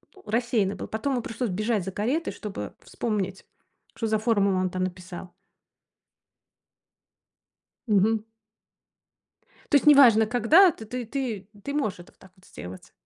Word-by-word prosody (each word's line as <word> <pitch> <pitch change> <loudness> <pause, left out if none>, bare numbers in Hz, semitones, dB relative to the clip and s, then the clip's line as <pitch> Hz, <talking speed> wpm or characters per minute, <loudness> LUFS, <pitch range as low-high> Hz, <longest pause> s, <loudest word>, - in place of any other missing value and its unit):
ну, 385 - -18
рассеянный 225 -3 0
был. - - -7
Потом 225 +6 -2
ему 250 - -1
пришлось 230 +1 -3
бежать 215 +2 -1
за 190 - -5
каретой, 255 - -2
чтобы 195 - -7
вспомнить, 195 -5 -3 0.5
что 225 - -2
за 220 0 +1
формулу 200 -4 +2
он 185 0 0
там 185 +1 -3
написал. 180 -1 -7 2.6
Мгм. 215 +1 +2 1.5
То - - +4
есть 285 - +4
неважно, 255 -7 +7
когда 250 - +5
ты 225 - -11
ты 245 +2 -5
ты 225 -6 -4 0.2
ты 280 - -4
можешь 270 -11 -1
это 175 - -14
вот - - -37
так 190 - -18
вот 185 0 -23
сделать? 90 +1 -10
220 Hz, 145 wpm, -26 LUFS, 190-245 Hz, 2.6 s, неважно